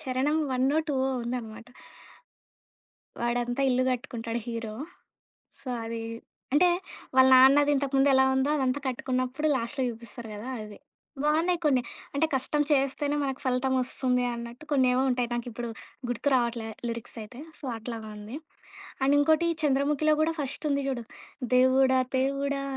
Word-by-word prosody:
చరణం 270 Hz, +1 st, 0 dB
వన్నో, 260 Hz, +3 st, +2 dB
టూవో 265 Hz, -2 st, +1 dB
ఉందనమాట. 230 Hz, -2 st, -5 dB, 1.5 s
వాడంతా 245 Hz, +2 st, 0 dB
ఇల్లు 255 Hz, 0 st, +2 dB
కట్టుకుంటాడు 235 Hz, -2 st, -4 dB
హీరో. 230 Hz, -2 st, -4 dB, 0.9 s
సో, -, -, -8 dB, 0.2 s
అదీ 225 Hz, 0 st, -4 dB, 0.5 s
అంటే, 355 Hz, +5 st, +6 dB, 0.5 s
వాళ్ళ 260 Hz, 0 st, +7 dB
నాన్నది 275 Hz, +3 st, +6 dB
ఇంతకుముందెలా 270 Hz, -1 st, +3 dB
ఉందో, 265 Hz, +2 st, +1 dB
అదంతా 265 Hz, 0 st, 0 dB
కట్టుకున్నప్పుడు 255 Hz, +3 st, -1 dB
లాస్ట్‌లో 260 Hz, +3 st, -2 dB
చూపిస్తారు 235 Hz, 0 st, -8 dB
గదా 210 Hz, +4 st, -7 dB
అది. 210 Hz, -1 st, -10 dB, 0.4 s
బావున్నాయి 325 Hz, +4 st, +2 dB
కొన్ని, 265 Hz, -4 st, +3 dB, 0.3 s
అంటే 280 Hz, +3 st, +2 dB
కష్టం 280 Hz, +3 st, +1 dB
చేస్తేనే 285 Hz, +1 st, +1 dB
మనకు 270 Hz, -1 st, -3 dB
ఫలితమోస్తుంది 255 Hz, 0 st, +1 dB
అన్నట్టు 235 Hz, +4 st, -8 dB
కొన్నేవో 255 Hz, -2 st, +3 dB
ఉంటాయి, 245 Hz, -1 st, 0 dB
నాకిప్పుడు 240 Hz, 0 st, -4 dB, 0.4 s
గుర్తు 245 Hz, +4 st, -1 dB
రావట్లే, 235 Hz, -2 st, 0 dB, 0.2 s
లిరిక్సైతే. 230 Hz, +1 st, -7 dB, 0.2 s
సో, -, -, -11 dB
అట్లాగా 225 Hz, -1 st, -6 dB
ఉంది. 210 Hz, +6 st, -8 dB, 0.7 s
అండ్ 275 Hz, +2 st, +4 dB
ఇంకోటి 315 Hz, +3 st, +3 dB, 0.2 s
చంద్రముఖిలో 295 Hz, +2 st, +2 dB
గూడా 320 Hz, +1 st, +2 dB
ఫస్టుంది 280 Hz, 0 st, -1 dB
చూడు, 240 Hz, -3 st, -3 dB, 0.5 s
దేవుడా, 260 Hz, +1 st, +5 dB, 0.2 s
దేవుడా, 275 Hz, +1 st, 0 dB
260 Hz, 120 wpm, -28 LUFS, 240-280 Hz, 1.5 s, వాళ్ళ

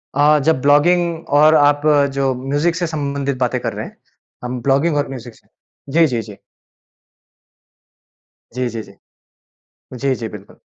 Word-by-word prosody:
अ, 150 Hz, +1 st, +4 dB
जब 160 Hz, -5 st, +2 dB
ब्लॉगिंग 165 Hz, +3 st, +2 dB
और 155 Hz, +1 st, +6 dB
आप 145 Hz, -1 st, +4 dB, 0.3 s
जो 135 Hz, -1 st, 0 dB
म्यूज़िक 145 Hz, +6 st, -1 dB
से 175 Hz, -1 st, -2 dB
संबंधित 140 Hz, -3 st, -3 dB
बातें 125 Hz, -2 st, -1 dB
कर -, -, -3 dB
रहे -, -, -5 dB
हैं, -, -, -13 dB, 0.5 s
अम 125 Hz, 0 st, -4 dB
ब्लॉगिंग 140 Hz, +4 st, +1 dB
और 145 Hz, -, 0 dB
म्यूज़िक 120 Hz, -3 st, -9 dB
से -, -, -26 dB, 0.4 s
जी, 160 Hz, +3 st, +4 dB
जी, 120 Hz, -4 st, -2 dB
जी। 105 Hz, -2 st, -12 dB, 2.2 s
जी, 125 Hz, 0 st, -2 dB
जी, 115 Hz, -1 st, -5 dB
जी। 100 Hz, -, -16 dB, 1.1 s
जी, 135 Hz, 0 st, 0 dB
जी, 115 Hz, -3 st, -5 dB
बिल्कुल। 105 Hz, -2 st, -13 dB
140 Hz, 150 wpm, -18 LUFS, 125-155 Hz, 2.2 s, और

